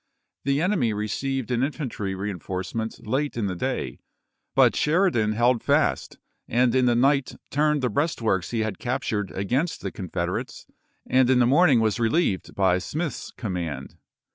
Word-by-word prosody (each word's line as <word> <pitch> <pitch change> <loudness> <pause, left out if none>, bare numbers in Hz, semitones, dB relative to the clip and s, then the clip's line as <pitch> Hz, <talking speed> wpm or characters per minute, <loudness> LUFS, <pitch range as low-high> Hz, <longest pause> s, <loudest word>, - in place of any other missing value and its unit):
The 140 +3 +1
enemy 175 - +1
received 125 +5 -2
an 120 -1 +1
infantry 130 -9 -3
reenforcement 95 +4 -4
late 135 +4 -1
in 115 - 0
the 95 -2 -2
day, - - -3 0.6
but - - +5
Sheridan 150 - +2
held 120 +2 +2
fast, - - +1 0.3
and 120 0 +2
in 130 -1 +3
the 120 - +3
night 135 +2 +2 0.2
turned 150 -1 +2
the 125 - +2
breastworks 115 - 0
he 115 -2 -1
had 110 -3 -3
captured 110 -5 -2
against 125 - -1
the - - -4
Confederates, 90 -2 -4 0.4
and 130 -1 +3
in 130 - +5
the 125 - +5
morning 140 -1 +5
was 110 +1 +1
reheved 115 - 0
by 95 -2 +3
Smith's 155 - -4
command. 85 - -5
120 Hz, 150 wpm, -25 LUFS, 100-140 Hz, 0.6 s, but